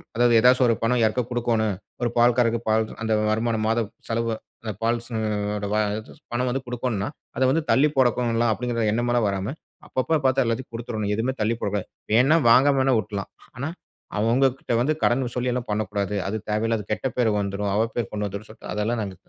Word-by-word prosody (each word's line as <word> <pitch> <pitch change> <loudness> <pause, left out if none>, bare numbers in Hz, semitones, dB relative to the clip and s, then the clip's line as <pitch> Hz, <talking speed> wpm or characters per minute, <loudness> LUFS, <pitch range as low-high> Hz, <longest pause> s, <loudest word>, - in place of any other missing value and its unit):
அதாவது 120 +1 +4
எதாச்சும் 125 +2 +5
ஒரு 115 - +3
பணம் 120 +1 +2
யாருக்கா 115 +3 +2
கொடுக்கணும். 115 -4 0 0.3
ஒரு 120 - +1
பால்காரருக்கு 120 -1 +4
பால் 110 0 +3 0.2
அந்த 110 -1 0 0.2
வருமானம் 110 0 0
மாத 115 +1 +2 0.3
செலவு 115 0 -1 0.3
அந்த 110 - -3
பால் 115 +1 +1
செலவு 105 -1 -2 0.2
பணம் 125 +1 0
வந்து 135 +2 -1
கொடுக்கணுனா, 120 -4 -2 0.3
அத 130 - -3
வந்து 160 +4 +2
தள்ளி 145 +3 +5
போடக்கும்லாம் 120 -2 +2
அப்பிடிங்கிற 115 0 -1
எண்ணமெல்லாம் 120 0 +1
வராம, 100 +6 -2 0.3
அப்பப்போ 155 +5 +1
பார்த்தா 130 0 +4
எல்லாத்தையும் 115 +1 -3
கொடுத்துரணும். 110 -3 -2
எதுமே 120 +5 -1
தள்ளி 115 +2 +1
போடக் 100 -2 -2
கூடாது. 100 - -2 0.3
வேணா 135 +8 +5
வாங்காம 135 +4 +6
வேணா 130 -1 +3
விட்டுர்லாம் 100 -1 -5 0.3
ஆனா, 140 +4 -3 0.5
அவுங்ககிட்ட 125 +3 +1
வந்து 150 +5 +2
கடன் 120 0 +1
சொல்லி 125 0 0
எல்லாம் 125 -2 -4
பண்ணக்கூடாது. 105 -1 -1
அது 110 - -2
தேவையில்லாத 110 0 0
கெட்ட 120 - -1
பேரு 115 -3 +3
வந்துரும். 100 0 -2
அவ 110 +2 +2
பேரு 120 -4 -1
கொண்டு 105 -1 -2
வந்துரும் 100 +2 -7
சொல்ட்டு 110 - -10
அதெல்லாம் 110 +2 -1
நாங்க 95 -2 -6
115 Hz, 175 wpm, -24 LUFS, 105-125 Hz, 0.5 s, வாங்காம